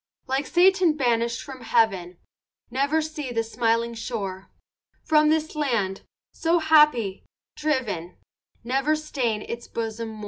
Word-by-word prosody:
Like 270 Hz, +2 st, -1 dB
Satan 360 Hz, -3 st, +4 dB
banishèd 235 Hz, -3 st, 0 dB
from 265 Hz, -2 st, -10 dB
heaven, 195 Hz, -6 st, +1 dB, 0.5 s
Never 285 Hz, +4 st, +1 dB
see 300 Hz, -4 st, -5 dB
the 230 Hz, -1 st, 0 dB
smiling 230 Hz, +1 st, 0 dB
shore; 205 Hz, -5 st, -5 dB, 0.5 s
From 305 Hz, -1 st, +4 dB
this 315 Hz, 0 st, 0 dB
land, 230 Hz, -10 st, -1 dB, 0.3 s
so 335 Hz, +1 st, +1 dB
happy, 300 Hz, -, +4 dB, 0.3 s
driven, 230 Hz, -, -2 dB, 0.5 s
Never 270 Hz, +5 st, +1 dB
stain 255 Hz, -8 st, -2 dB
its 235 Hz, 0 st, -7 dB
bosom 225 Hz, 0 st, -4 dB
more. 220 Hz, -1 st, -9 dB
245 Hz, 125 wpm, -25 LUFS, 225-305 Hz, 0.5 s, Satan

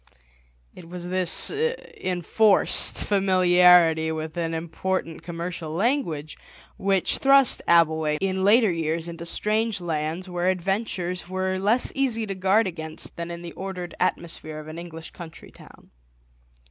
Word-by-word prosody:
It 170 Hz, -, -13 dB
was 175 Hz, 0 st, -7 dB
this 185 Hz, -1 st, +1 dB
enforced 220 Hz, -, +1 dB
familiarity 180 Hz, -4 st, +4 dB
with 155 Hz, 0 st, -5 dB
an 165 Hz, -1 st, -2 dB
important 165 Hz, +1 st, -3 dB
commercial 170 Hz, -1 st, -6 dB
language 170 Hz, -, -1 dB, 0.4 s
which 195 Hz, -1 st, 0 dB
thrust 275 Hz, -1 st, +5 dB
Abbleway 160 Hz, -2 st, +3 dB
in 190 Hz, 0 st, -1 dB
later 215 Hz, +1 st, +5 dB
years 165 Hz, 0 st, -2 dB
into 170 Hz, 0 st, -6 dB
strange 215 Hz, +3 st, 0 dB
lands 165 Hz, +1 st, -3 dB
where 180 Hz, 0 st, -2 dB
adventures 185 Hz, -1 st, -2 dB
were 185 Hz, 0 st, -2 dB
less 215 Hz, +6 st, +1 dB
easy 245 Hz, -5 st, 0 dB
to 200 Hz, -, -4 dB
guard 195 Hz, +4 st, +2 dB
against 160 Hz, -3 st, -6 dB
than 170 Hz, 0 st, -5 dB
in 170 Hz, 0 st, -7 dB
the 170 Hz, -, -7 dB
ordered 185 Hz, -2 st, -6 dB
atmosphere 165 Hz, -3 st, -3 dB
of 155 Hz, -, -10 dB
an 155 Hz, +2 st, -8 dB
English 165 Hz, -2 st, -9 dB
country 165 Hz, -2 st, -11 dB
town. -, -, -17 dB
180 Hz, 135 wpm, -24 LUFS, 165-195 Hz, 0.4 s, thrust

